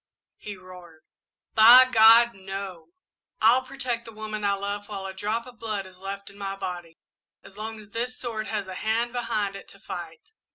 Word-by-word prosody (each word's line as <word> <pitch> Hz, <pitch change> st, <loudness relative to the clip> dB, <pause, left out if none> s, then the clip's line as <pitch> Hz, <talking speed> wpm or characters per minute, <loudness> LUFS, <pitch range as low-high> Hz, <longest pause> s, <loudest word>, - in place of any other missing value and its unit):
he 205 Hz, -2 st, -8 dB
roared, 180 Hz, -3 st, -14 dB, 0.5 s
"by 240 Hz, +4 st, +9 dB
God, 235 Hz, -1 st, +6 dB
no! 195 Hz, -2 st, -7 dB, 0.5 s
I'll 235 Hz, +4 st, +5 dB
protect 255 Hz, -3 st, -4 dB
the 225 Hz, -, -10 dB
woman 215 Hz, -1 st, -6 dB
I 200 Hz, 0 st, +2 dB
love 200 Hz, +1 st, -4 dB
while 195 Hz, -2 st, -6 dB
a 190 Hz, -, -5 dB
drop 215 Hz, +4 st, -2 dB
of 245 Hz, -3 st, -14 dB
blood 215 Hz, -4 st, -3 dB
is 185 Hz, -1 st, -15 dB
left 195 Hz, +1 st, -6 dB
in 200 Hz, -, -17 dB
my 195 Hz, -1 st, -4 dB
body 175 Hz, -4 st, -6 dB, 0.5 s
as 195 Hz, -, -15 dB
long 220 Hz, +1 st, -6 dB
as 210 Hz, -1 st, -15 dB
this 245 Hz, +3 st, -3 dB
sword 220 Hz, -3 st, -4 dB
has 210 Hz, -3 st, -3 dB
a 185 Hz, -, -6 dB
hand 230 Hz, +5 st, -1 dB
behind 210 Hz, -5 st, -2 dB
it 195 Hz, -, -10 dB
to -, -, -15 dB
fight. 465 Hz, -, -9 dB
210 Hz, 190 wpm, -26 LUFS, 195-230 Hz, 0.5 s, by